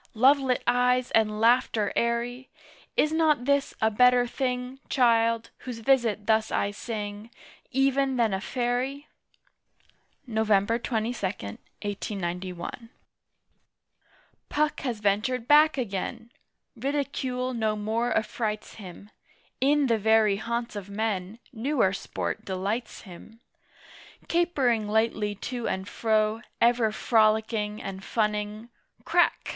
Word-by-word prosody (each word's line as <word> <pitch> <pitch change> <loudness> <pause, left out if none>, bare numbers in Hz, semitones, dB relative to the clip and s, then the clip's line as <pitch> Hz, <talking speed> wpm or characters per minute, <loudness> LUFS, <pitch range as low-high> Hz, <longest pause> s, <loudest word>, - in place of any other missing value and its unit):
Lovelit 265 +2 +4
eyes 250 +1 +2
and 215 -1 +2
laughter 230 -2 +3
airy! 240 +2 -1 0.5
Is 305 - +3
not 310 -5 +2
this 280 0 +1
a 220 - +4
better 250 +2 +5
thing, 250 +1 -3
Child, 230 -3 +2
whose 250 -3 -7
visit 230 -3 +1
thus 220 -1 +2
I 200 - 0
sing, 210 0 -6 0.4
Even 270 0 +1
than 225 -4 +2
a 190 - -1
Fairy? 255 +5 -2 1.2
Nov. 220 -3 -1
22, 220 +2 +1
1891. 190 - -5 1.6
Puck 300 +1 0
has 240 -6 -3
ventured 225 +5 0
back 300 0 +6
agen: 230 +1 -4 0.4
Ridicule 255 -1 -2
no 220 -2 0
more 220 +3 -1
affrights 215 -1 -2
him: 195 +2 -11 0.5
In 285 +2 +3
the 230 -3 +2
very 215 -1 +4
haunts 235 +2 -3
of 200 -1 -6
men 200 -1 -2 0.2
Newer 235 -4 +1
sport - - -4
delights 200 +5 -3
him. 210 +4 -13 0.9
Capering 270 -11 +1
lightly 215 -1 0
to 240 +3 -4
and 190 +1 -3
fro, 220 0 +1 0.2
Ever 235 -2 +3
frolicking 215 -1 +1
and 195 0 -7
funning 210 +1 -2 0.4
"Crack!" - - +2
230 Hz, 110 wpm, -27 LUFS, 210-250 Hz, 1.6 s, back